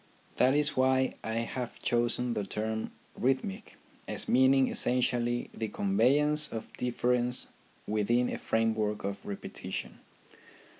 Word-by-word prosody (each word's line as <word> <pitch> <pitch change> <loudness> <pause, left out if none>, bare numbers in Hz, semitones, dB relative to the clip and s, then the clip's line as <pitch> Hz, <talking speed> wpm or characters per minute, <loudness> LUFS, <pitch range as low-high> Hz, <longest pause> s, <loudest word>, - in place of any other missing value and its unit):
That 130 +2 +4
is 150 0 +2
why 130 0 +2
I 110 0 -3
have 120 +1 -4
chosen 120 0 0
the 105 -2 -2
term 110 +2 -3
" - - -31
rhythmic," 130 -7 -1 0.3
as - - -3
meaning 130 +1 +5
essentially 120 -1 +1
the 110 - -3
conveyance 140 +10 +2
of 115 - -6
difference 125 0 0 0.4
within 115 +4 +1
a - - -4
framework 110 -2 0
of 100 0 -4
repetition. 100 - -6
120 Hz, 120 wpm, -30 LUFS, 110-130 Hz, 0.4 s, meaning